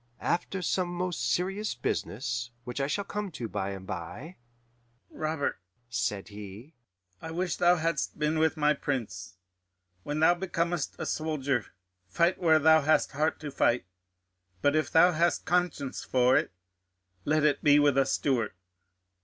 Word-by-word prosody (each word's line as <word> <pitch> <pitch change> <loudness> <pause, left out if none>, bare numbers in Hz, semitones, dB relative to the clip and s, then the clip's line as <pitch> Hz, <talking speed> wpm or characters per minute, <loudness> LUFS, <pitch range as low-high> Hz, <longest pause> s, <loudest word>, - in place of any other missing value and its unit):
After 180 +2 -1
some 180 +2 0
most 175 -8 -2
serious 195 +4 -1
business, 120 +1 -3
which 125 +3 -4
I 135 - 0
shall 200 +7 -1
come 205 0 -4
to 120 -5 -4
by 100 -2 -3
and 95 -1 -7
bye, 105 - -7 0.7
'Robert,' 155 -2 -2 0.3
said 110 -4 -2
he, 105 +7 -10 0.5
'I 160 - -6
wish 175 +2 -2
thou 175 0 +5
hadst 165 0 -1
been 155 +1 0
with 160 0 +2
my 150 0 +3
Prince. 95 -12 -4 0.6
When 145 +8 -3
thou 160 +2 +6
becomest 175 -3 -2
a - - -4
soldier, 140 -6 -1 0.4
fight 170 - +1
where 160 -3 +5
thou 160 +1 +5
hast 155 +2 +2
heart 150 +2 0
to 150 -2 -5
fight; 120 -2 +2 0.8
but 145 +1 +3
if 155 - +1
thou 175 +2 +6
hast 170 +1 +1
conscience 175 -6 -1
for 125 0 +3
it, - - +1 0.7
let 155 0 +1
it 150 -1 +2
be 145 0 +6
with 145 -2 +4
a 135 -1 +3
Stuart. 125 -8 0
150 Hz, 155 wpm, -29 LUFS, 125-170 Hz, 0.8 s, thou